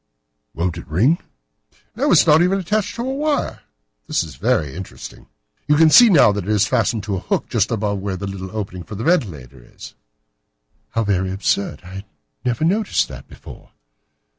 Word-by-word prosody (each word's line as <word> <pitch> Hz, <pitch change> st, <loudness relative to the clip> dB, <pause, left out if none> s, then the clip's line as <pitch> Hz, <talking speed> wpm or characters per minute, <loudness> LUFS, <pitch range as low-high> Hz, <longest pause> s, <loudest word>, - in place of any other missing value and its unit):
"Won't 85 Hz, 0 st, -2 dB
it -, -, -12 dB
ring?" 120 Hz, -, +2 dB, 0.8 s
"No, 290 Hz, -, 0 dB
it -, -, +5 dB
is -, -, +6 dB
not 155 Hz, 0 st, +5 dB
even 185 Hz, +2 st, +2 dB
attached 205 Hz, +2 st, -2 dB
to 235 Hz, -, -4 dB
a 260 Hz, +1 st, -2 dB
wire. 295 Hz, +1 st, -1 dB, 0.5 s
This -, -, 0 dB
is 80 Hz, -4 st, -10 dB
very 70 Hz, +2 st, 0 dB
interesting. 95 Hz, +2 st, -10 dB, 0.4 s
You 150 Hz, -, +4 dB
can 160 Hz, +1 st, +5 dB
see 240 Hz, +5 st, +8 dB
now 150 Hz, -, +6 dB
that 100 Hz, -3 st, -4 dB
it -, -, -5 dB
is 105 Hz, -1 st, +3 dB
fastened 115 Hz, -3 st, 0 dB
to 100 Hz, -2 st, -2 dB
a -, -, -3 dB
hook -, -, -2 dB
just -, -, +1 dB
above 105 Hz, -2 st, -1 dB
where 95 Hz, -1 st, -4 dB
the 100 Hz, -, -5 dB
little 95 Hz, -1 st, -6 dB
opening 95 Hz, -3 st, -5 dB
for 85 Hz, +5 st, -9 dB
the 110 Hz, -, -5 dB
ventilator 75 Hz, -, -1 dB
is." -, -, -13 dB, 1.0 s
"How 115 Hz, -, -1 dB
very 95 Hz, -2 st, 0 dB
absurd! 100 Hz, +1 st, -1 dB
I 95 Hz, +2 st, -9 dB, 0.4 s
never 125 Hz, +4 st, -1 dB
noticed 205 Hz, +5 st, +1 dB
that -, -, -10 dB
before." -, -, -14 dB
105 Hz, 190 wpm, -20 LUFS, -, 1.0 s, see